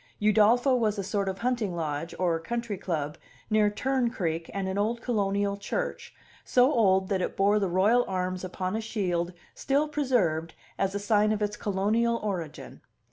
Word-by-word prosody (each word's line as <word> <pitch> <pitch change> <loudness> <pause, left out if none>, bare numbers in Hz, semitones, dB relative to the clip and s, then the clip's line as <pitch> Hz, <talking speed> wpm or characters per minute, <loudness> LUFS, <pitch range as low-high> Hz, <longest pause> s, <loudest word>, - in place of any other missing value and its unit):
Udolpho 220 +5 +4
was 215 -2 +1
a 200 - -2
sort 200 0 -1
of 190 - -4
hunting 230 -5 -1
lodge 160 0 -3
or 170 -3 +1
country 235 +5 -3
club 155 -6 -3 0.3
near 215 -1 +4
Tern 255 +3 0
Creek 165 -6 -3
and 195 -1 -3
an 190 - -2
old 225 +3 0
colonial 200 -3 0
church, - - -4 0.3
so 255 +4 +4
old 190 -5 +3
that 190 -2 0
it - - -3
bore 205 +2 +4
the 195 -2 0
royal 205 +7 +4
arms 185 -1 -2
upon 185 +1 -3
a 220 - -1
shield 180 -6 -1 0.2
still 285 +3 0
preserved 230 - 0 0.2
as 195 0 0
a - - 0
sign 210 +1 +2
of 215 -1 0
its 210 0 -1
colonial 215 +4 +1
origin. 180 -7 -5
200 Hz, 175 wpm, -28 LUFS, 185-230 Hz, 0.3 s, Udolpho